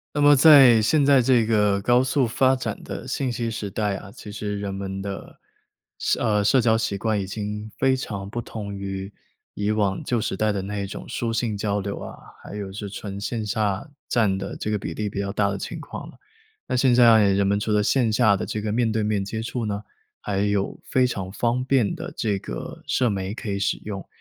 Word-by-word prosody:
那 145 - +1
么 145 0 +7
在 135 -5 +8
现 145 +7 +3
在 135 -2 +5
这 120 -2 +4
个 105 -3 +2
高 120 +4 +4
速 130 -1 +1
发 130 +3 +3
展 130 - -4
的 - - -7
信 130 -3 -1
息 115 -1 -2
时 110 -3 -4
代 105 -1 -1
啊， 100 +1 -9
其 105 - -9
实 105 0 -4
人 100 -1 -3
们 95 0 -4
的， 100 0 -7 0.6
社 - - 0
呃， 105 -3 +2
社 130 +5 +4
交 115 -1 +3
习 110 -3 -2
惯 110 -1 0
已 95 - -2
经 105 +2 -5
非 135 0 +3
常 100 -6 -5
不 120 - -4
同 105 -3 -6
于 95 0 -5 0.4
以 105 +1 0
往 100 -3 0
旧 120 -3 0
时 95 - -2
代 110 +1 +2
的 100 -2 -2
那 100 +2 -5
一 - - -2
种 95 - -8
书 115 -1 -2
信 115 -2 -1
交 100 0 -1
流 100 0 -4
啊， - - -8 0.3
还 - - -9
有 100 -2 -5
是 105 +1 -6
纯 100 -1 -6
线 110 +2 -3
下 105 +3 -1 0.2
占 105 -5 +2
的 95 - -5
这 - - -4
个 105 - +1
比 90 -4 -5
例 105 +4 -3
比 100 - -5
较 100 0 -2
大 100 0 +1
的 100 - -2
情 - - -6
况 - - -8
了。 - - -13 0.5
那 - - -1
现 125 0 +4
在 115 -4 +6
人 100 0 +2
们 100 +1 +2
除 110 +1 -2
了 105 0 +3
线 115 0 +2
下 110 -4 +4
的 - - -3
这 110 - -3
个 105 0 -2
面 115 0 +1
对 110 0 0
面 105 -2 0
接 110 +2 -4
触 115 0 -3
呢， 105 -1 -2 0.4
还 100 -2 -2
有 100 -1 0
非 130 -1 +2
常 95 -6 -4
方 120 +4 0
便 130 -1 +2
的 170 +1 -7
这 105 -4 0
个 - - -7
社 125 -2 +1
媒 95 -1 -3
可 115 -1 -6
以 100 - -1
使 100 0 0
用， 100 -2 -7
105 Hz, 250 characters per minute, -24 LUFS, 100-120 Hz, 0.6 s, 在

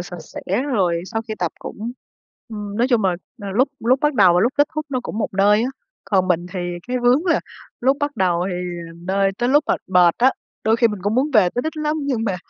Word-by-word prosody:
sạch - - -7
sẽ - - -9 0.2
rồi 185 -11 0
sau 225 - -1
khi 215 - -3
tập 175 -3 -1
cũng, 225 +3 -6 0.6
ừm, 210 -2 -6
nói 240 +3 +2
chung 235 -5 +2
là, 190 - +4 0.3
ờ, 200 - -4
lúc 245 +8 +2
lúc 255 +4 +2
bắt 295 -1 +1
đầu 190 -7 +6
và 175 - +4
lúc 240 +6 +2
kết 290 +1 +4
thúc 305 -1 -3
nó 260 -3 -2
cũng 220 - -5
một - - 0
nơi 205 +3 +4
á. 250 - 0 0.4
Còn 190 -2 +1
mình 175 -1 +1
thì 190 - -4 0.3
cái 250 0 0
vướng 250 +8 +3
là 335 - +3 0.4
lúc 265 +3 +3
bắt 290 0 -2
đầu 180 -1 +1
thì - - -3 0.4
một 165 - -15
nơi, 195 +1 +2
tới 240 - +1
lúc 290 +3 +4
mệt - - 0
mệt 180 -2 +4
á, 260 +2 +5 0.3
đôi 220 +1 +3
khi 235 0 +4
mình 210 -3 -5
cũng 205 +3 0
muốn 270 +5 +1
về 210 -9 +5
tới 245 - 0
đích 315 0 -4
lắm 305 0 -1
nhưng 260 -6 -1
mà, 190 -4 -1
225 Hz, 255 wpm, -21 LUFS, 190-260 Hz, 0.6 s, đầu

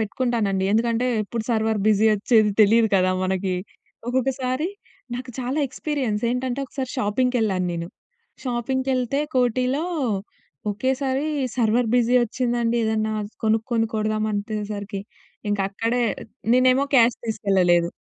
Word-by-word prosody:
పెట్టుకుంటానండి. 220 -4 0
ఎందుకంటే, 230 +2 +1 0.2
ఎప్పుడు 225 +2 -4
సర్వర్ 220 -1 +1
బిజీ 215 0 +4
ఓచ్చేది 215 +1 +3
తెలియదు 220 +2 +5
కదా 185 0 +3
మనకి. 190 0 -1 0.5
ఒక్కొక్కసారి 255 +3 0 0.5
నాకు 250 +1 -6
చాలా 260 +3 -2
ఎక్స్‌పి‌రి‌యన్స్ 260 -6 -2
ఏంటంటే, 250 +1 -2
ఒకసారి 260 -1 -5
షాపింగ్‌కెళ్ళాను 220 -4 +1
నేను, 170 0 -4 0.6
షాపింగ్‌‌కేళ్తే 260 +1 -1
కోటిలో 255 +4 +1 0.9
ఒకేసారి 265 +5 -1 0.3
సర్వర్ 235 0 +2
బిజీ 245 0 +3
ఓచ్చిందండి. 240 0 0
ఏదన్నా 220 0 0 0.3
కొనుక్కొని 225 +1 +1
కొడదాం 215 0 0
అంతేసరికి 205 -1 -4 0.5
ఇంక 205 - 0
అక్కడే 230 +4 0 0.5
నేనేమో 255 +2 +4
క్యాష్ 240 -2 +5
తీసుకెళ్లలేదు. 185 -6 +2
230 Hz, 105 wpm, -23 LUFS, 210-255 Hz, 0.9 s, తెలియదు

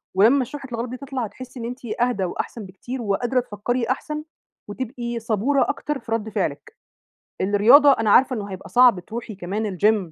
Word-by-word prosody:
ولمّا 240 +7 +5
شُحنة 275 0 -9
الغضب 235 +1 -3
دي 255 - -5
تطلع، 265 -2 -4
هتحِسِّي 250 +4 -10
إن 230 - -5
أنتِ 245 +2 -6 0.2
أهدى 245 -5 +1
وأحسن 205 +4 -5
بكتير، 240 +7 -7
وقادرة 235 +4 0
تفكري 240 +1 -2
أحسن، 300 +3 -2 0.5
وتبقي 235 +1 -4
صبُورة 230 +5 +1
أكتر 295 -2 -3
في 230 - -12
رَدّ 225 -1 -1
فعلِك، 450 - -3 0.6
الرياضة 225 +9 +6
أنا 225 -4 0
عارفة 255 +3 +5
إنه 205 -3 -5
هيبقى 190 - -8
صعب 245 -5 +5
تروحي 225 +3 -7
كمان 195 +2 -3
الGym 205 -5 +2
235 Hz, 170 wpm, -23 LUFS, 205-255 Hz, 0.6 s, الرياضة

